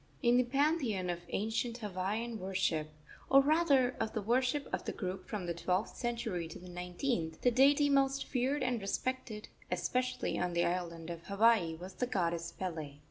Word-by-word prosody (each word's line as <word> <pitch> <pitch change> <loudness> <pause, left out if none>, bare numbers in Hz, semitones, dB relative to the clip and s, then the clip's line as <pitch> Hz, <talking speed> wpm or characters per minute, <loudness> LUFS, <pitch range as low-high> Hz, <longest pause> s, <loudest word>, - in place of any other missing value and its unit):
In 240 0 +5
the 250 - +5
pantheon 255 - +1
of 175 - -4
ancient 225 +3 -1
Hawaiian 215 +2 -3
worship 185 -5 0 0.4
or, 270 - +8
rather, 280 -3 +3
of 220 -1 -1
the 220 - -1
worship 255 +5 +1
of - - -2
the - - -1
group 185 -1 -5
from 205 -4 -3
the 170 - -1
twelfth 180 +4 -1
century 230 -8 -2
to 165 - -9
the 180 - -12
nineteenth 180 - -3
the 245 - +4
deity 280 +4 +5
most 275 -1 +2
feared 260 +2 0
and 245 -3 0
respected, 220 +1 -3 0.2
especially 255 0 -1
on 180 0 -1
the 170 0 +2
island 170 -2 -3
of 170 0 -8
Hawaii, 200 -5 +3
was 180 +3 -9
the 250 +7 -2
goddess 170 -5 -1
Pele. 160 -6 -5
215 Hz, 175 wpm, -33 LUFS, 180-255 Hz, 0.4 s, or